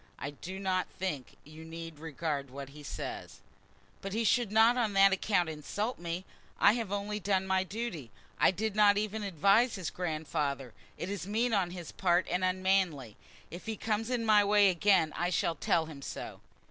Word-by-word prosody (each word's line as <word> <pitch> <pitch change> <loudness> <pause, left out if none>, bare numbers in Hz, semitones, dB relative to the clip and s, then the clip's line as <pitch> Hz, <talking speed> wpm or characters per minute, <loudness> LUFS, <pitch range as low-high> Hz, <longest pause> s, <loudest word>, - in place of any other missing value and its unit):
"I 140 - -5
do 180 +6 -8
not 190 -1 0
think 150 -9 -5
you 155 +2 -12
need 165 -1 -8
regard 150 -3 -3
what 135 +1 -8
he 150 +2 -12
says." 145 - -6 0.6
"But 195 0 -5
he 225 +2 0
should 230 0 +2
not 225 +3 +5
on 230 -4 0
that 195 0 +6
account 190 -2 +1
insult 200 - -3
me. 170 +2 -4 0.3
I 200 - +6
have 225 -4 -3
only 205 +1 -2
done 190 0 0
my 190 0 +2
duty. 195 - -5 0.3
I - - +6
did 205 +3 -2
not 205 -1 +5
even 215 +1 -2
advise 200 - +3
his 185 -5 -4
grandfather. 150 -7 -3 0.2
It 185 - -4
is 200 -2 -4
mean 225 +3 0
on 190 -4 +2
his 175 -2 -8
part 180 -1 +1
and 180 +1 0
unmanly. 185 - +1 0.4
If 175 +6 -9
he 220 -1 -3
comes 220 +1 -1
in 240 -2 -1
my 210 -2 +6
way 205 -1 +5
again 180 -3 +3
I 175 +1 0
shall 170 -2 +1
tell 165 +1 +1
him 155 -3 -10
so." - - -7
190 Hz, 185 wpm, -31 LUFS, 160-210 Hz, 0.6 s, that